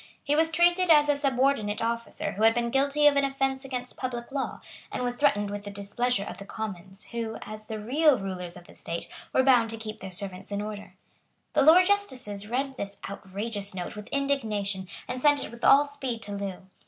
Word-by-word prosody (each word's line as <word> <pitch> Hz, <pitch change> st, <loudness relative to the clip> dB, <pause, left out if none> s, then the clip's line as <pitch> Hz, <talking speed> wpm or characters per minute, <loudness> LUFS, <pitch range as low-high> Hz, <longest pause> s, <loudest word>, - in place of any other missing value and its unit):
He 290 Hz, -, +1 dB
was 320 Hz, +1 st, +3 dB
treated 345 Hz, +2 st, +3 dB
as 295 Hz, -2 st, +6 dB
a 290 Hz, -, +4 dB
subordinate 265 Hz, -6 st, +1 dB
officer 230 Hz, 0 st, -2 dB
who 205 Hz, -, -6 dB
had 225 Hz, +1 st, +6 dB
been 235 Hz, 0 st, 0 dB
guilty 280 Hz, +3 st, +2 dB
of 295 Hz, -1 st, +7 dB
an 280 Hz, -, +4 dB
offence 270 Hz, 0 st, 0 dB
against 250 Hz, -2 st, -4 dB
public 245 Hz, -2 st, -4 dB
law, 275 Hz, -1 st, -3 dB, 0.3 s
and -, -, -2 dB
was 245 Hz, 0 st, -1 dB
threatened 205 Hz, -8 st, +2 dB
with 205 Hz, 0 st, -5 dB
the 205 Hz, -, -6 dB
displeasure 200 Hz, +3 st, -1 dB
of -, -, -7 dB
the -, -, -7 dB
Commons, 195 Hz, -2 st, -6 dB
who, 230 Hz, -1 st, -3 dB
as 215 Hz, 0 st, -9 dB
the 220 Hz, -1 st, -4 dB
real 280 Hz, +6 st, +4 dB
rulers 185 Hz, -3 st, -5 dB
of 175 Hz, -, -13 dB
the -, -, -15 dB
state, 170 Hz, 0 st, -4 dB, 0.2 s
were 260 Hz, -, +3 dB
bound 245 Hz, -4 st, +5 dB
to 225 Hz, -, -4 dB
keep 220 Hz, -1 st, -7 dB
their 190 Hz, -, -7 dB
servants 190 Hz, +1 st, -8 dB
in 200 Hz, -, -1 dB
order. 210 Hz, 0 st, -6 dB, 0.6 s
The -, -, +4 dB
Lords 340 Hz, +6 st, +7 dB
justices 255 Hz, -, -1 dB
read 265 Hz, +2 st, -1 dB
this 200 Hz, -2 st, -5 dB
outrageous 200 Hz, +1 st, -5 dB
note 180 Hz, +2 st, -5 dB
with 210 Hz, 0 st, -8 dB
indignation, 215 Hz, -9 st, -1 dB, 0.2 s
and 250 Hz, 0 st, -4 dB
sent 290 Hz, 0 st, +4 dB
it -, -, -9 dB
with 235 Hz, 0 st, -12 dB
all 285 Hz, +1 st, +7 dB
speed 265 Hz, -5 st, -4 dB
to 205 Hz, -, -6 dB
Loo. 195 Hz, -2 st, -5 dB
235 Hz, 210 wpm, -27 LUFS, 205-275 Hz, 0.6 s, of